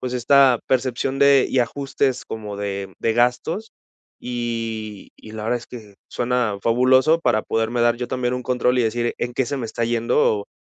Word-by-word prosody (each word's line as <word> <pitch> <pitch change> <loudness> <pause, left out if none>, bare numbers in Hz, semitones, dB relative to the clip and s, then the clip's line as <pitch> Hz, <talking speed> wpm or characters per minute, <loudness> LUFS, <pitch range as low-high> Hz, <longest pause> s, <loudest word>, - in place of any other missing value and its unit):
pues, 125 -1 -4
esta 130 0 +4
percepción 130 +1 0
de 140 -1 +5
y 130 - 0
ajustes 135 +1 -1
como 105 -2 -7
de 100 -1 -5
de 115 - +1
gastos 125 - 0 0.5
y 115 -4 -5
y 110 - -13
la 110 -1 -6
verdad 120 +2 0
es 120 - -14
que 110 -5 -11
suena 120 -4 -1
fabuloso 130 +7 +4
para 110 -9 +1
poderme 115 +2 -1
dar 120 0 +3
yo 125 0 -4
también 125 -1 -2
un 125 - -4
control 125 0 +1
y - - +3
decir 120 +1 -1
en 120 - -3
qué 130 - +1
se 140 - -3
me 125 -4 -4
está 115 +1 -3
yendo 115 -2 +1
120 Hz, 185 wpm, -21 LUFS, 115-130 Hz, 0.5 s, de